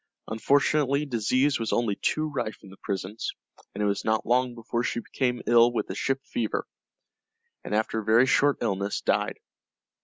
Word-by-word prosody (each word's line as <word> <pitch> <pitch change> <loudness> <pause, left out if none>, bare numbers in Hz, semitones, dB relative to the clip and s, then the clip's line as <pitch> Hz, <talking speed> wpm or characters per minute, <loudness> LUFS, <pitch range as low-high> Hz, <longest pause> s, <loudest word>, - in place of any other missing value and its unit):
Unfortunately 140 +4 +2
disease 130 +2 +1
was 115 - -2
only 115 -4 +1
too 155 +9 0
rife 130 -9 -4
in 95 - -13
the 95 - -14
prisons, 100 +2 -4 0.4
and 105 - -1
it - - +2
was 100 0 0
not 110 0 0
long 125 +1 +1
before 115 0 -3
she 125 -1 -1
became 125 0 -2
ill 120 0 +5
with 120 - -1
the - - -6
ship 135 0 -2
fever, 245 - -2 1.0
and - - -3
after 110 +1 0
a - - -5
very 110 +4 +5
short 145 +2 +3
illness 100 -3 -1
died. - - 0
120 Hz, 175 wpm, -26 LUFS, 110-135 Hz, 1.0 s, ill